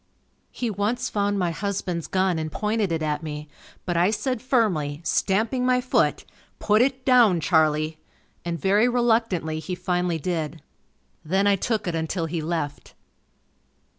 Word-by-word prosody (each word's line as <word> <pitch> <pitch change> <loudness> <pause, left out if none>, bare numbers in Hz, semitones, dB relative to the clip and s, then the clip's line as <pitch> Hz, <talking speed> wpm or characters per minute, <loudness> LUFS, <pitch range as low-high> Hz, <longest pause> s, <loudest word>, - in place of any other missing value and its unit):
He 240 -3 -3
once 220 +5 -1
found 205 -1 0
my 180 -3 0
husband's 180 -3 -3
gun 185 -3 +1
and 155 0 -4
pointed 210 -1 -1
it 160 -1 -1
at 150 -1 -1
me, 150 -1 -6 0.4
but 175 - -1
I 175 +3 +3
said 250 +2 -2
firmly, 180 - +1
stamping 220 +9 +1
my 250 0 +3
foot, 250 0 +1 0.3
"Put 215 +1 +3
it 260 0 0
down 240 -9 +5
Charlie," 155 0 +1 0.4
and 170 -1 -3
very 205 - +3
reluctantly 225 -10 +1
he 180 +3 -4
finally 180 -1 -1
did. 160 -1 -3 0.6
Then, 190 +5 +1
I 200 -1 +4
took 215 +1 -2
it 175 - -1
until 165 +1 -2
he 165 0 -3
left. 155 -3 -4
185 Hz, 150 wpm, -24 LUFS, 160-220 Hz, 0.6 s, down